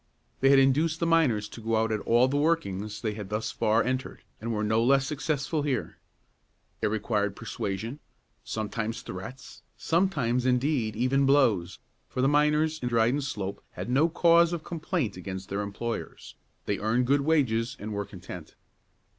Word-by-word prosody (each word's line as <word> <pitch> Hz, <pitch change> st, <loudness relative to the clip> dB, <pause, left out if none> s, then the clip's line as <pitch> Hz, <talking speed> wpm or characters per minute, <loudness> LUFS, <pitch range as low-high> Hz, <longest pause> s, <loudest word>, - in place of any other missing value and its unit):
They 135 Hz, -, +4 dB
had 140 Hz, -, +7 dB
induced 150 Hz, +5 st, +3 dB
the 170 Hz, -, +1 dB
miners 145 Hz, -11 st, +2 dB
to 115 Hz, -, -10 dB
go 115 Hz, +1 st, 0 dB
out 110 Hz, 0 st, +1 dB
at 110 Hz, -, 0 dB
all 120 Hz, +4 st, +3 dB
the 135 Hz, -, -2 dB
workings 110 Hz, -, 0 dB
they 110 Hz, -2 st, -1 dB
had 105 Hz, -2 st, -7 dB
thus 105 Hz, +1 st, -2 dB
far 110 Hz, +1 st, +2 dB
entered, 130 Hz, +2 st, -3 dB, 0.2 s
and 115 Hz, +1 st, -4 dB
were 105 Hz, -1 st, -1 dB
no 110 Hz, +2 st, +2 dB
less 135 Hz, +2 st, +4 dB
successful 150 Hz, +1 st, -1 dB
here. 140 Hz, -4 st, -2 dB, 0.8 s
It -, -, +2 dB
required 105 Hz, -1 st, -1 dB
persuasion, 115 Hz, +3 st, -4 dB, 0.4 s
sometimes 110 Hz, +1 st, -3 dB
threats, 110 Hz, +9 st, -9 dB, 0.2 s
sometimes, 150 Hz, -9 st, +1 dB
indeed, 125 Hz, -3 st, +1 dB
even 135 Hz, +4 st, +2 dB
blows, 120 Hz, -11 st, +3 dB, 0.3 s
for 130 Hz, -, -2 dB
the -, -, +4 dB
miners 150 Hz, +2 st, +2 dB
in 125 Hz, -, -1 dB
Dryden 120 Hz, +4 st, +2 dB
Slope 100 Hz, -7 st, -4 dB
had 120 Hz, -, -5 dB
no 145 Hz, +6 st, +4 dB
cause 170 Hz, 0 st, +4 dB
of 165 Hz, -2 st, -4 dB
complaint 160 Hz, -, -2 dB
against 95 Hz, 0 st, -6 dB
their 100 Hz, +1 st, -2 dB
employers; 110 Hz, +3 st, -5 dB, 0.3 s
they 100 Hz, -, -1 dB
earned 115 Hz, +4 st, +1 dB
good 140 Hz, +3 st, +3 dB
wages, 130 Hz, -5 st, +1 dB
and 105 Hz, +1 st, -5 dB
were 100 Hz, 0 st, -2 dB
content. 90 Hz, -4 st, -10 dB
120 Hz, 165 wpm, -28 LUFS, 105-145 Hz, 0.8 s, had